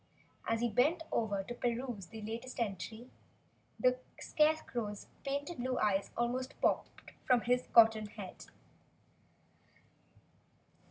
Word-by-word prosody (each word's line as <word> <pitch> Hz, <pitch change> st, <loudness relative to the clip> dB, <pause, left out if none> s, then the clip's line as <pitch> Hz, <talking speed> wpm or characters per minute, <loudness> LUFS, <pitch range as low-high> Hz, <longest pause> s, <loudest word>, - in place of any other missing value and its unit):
As 225 Hz, 0 st, +1 dB
he 240 Hz, -, +3 dB
bent 295 Hz, -, +3 dB
over 205 Hz, -4 st, 0 dB
to 240 Hz, -, -6 dB
peruse 240 Hz, -5 st, -2 dB
the 220 Hz, -1 st, -9 dB
latest 230 Hz, +4 st, -5 dB
entry, 220 Hz, +3 st, -4 dB, 0.7 s
the 255 Hz, 0 st, +3 dB, 0.2 s
Scarecrow's 245 Hz, -9 st, 0 dB, 0.2 s
painted 285 Hz, +4 st, -3 dB
blue 255 Hz, +1 st, -1 dB
eyes 200 Hz, -1 st, +1 dB
almost 250 Hz, +2 st, -1 dB
popped -, -, 0 dB, 0.2 s
from 250 Hz, -2 st, +5 dB
his 250 Hz, +2 st, +1 dB
cotton 220 Hz, -2 st, +6 dB
head. 205 Hz, -3 st, -9 dB
240 Hz, 110 wpm, -34 LUFS, 215-255 Hz, 0.7 s, cotton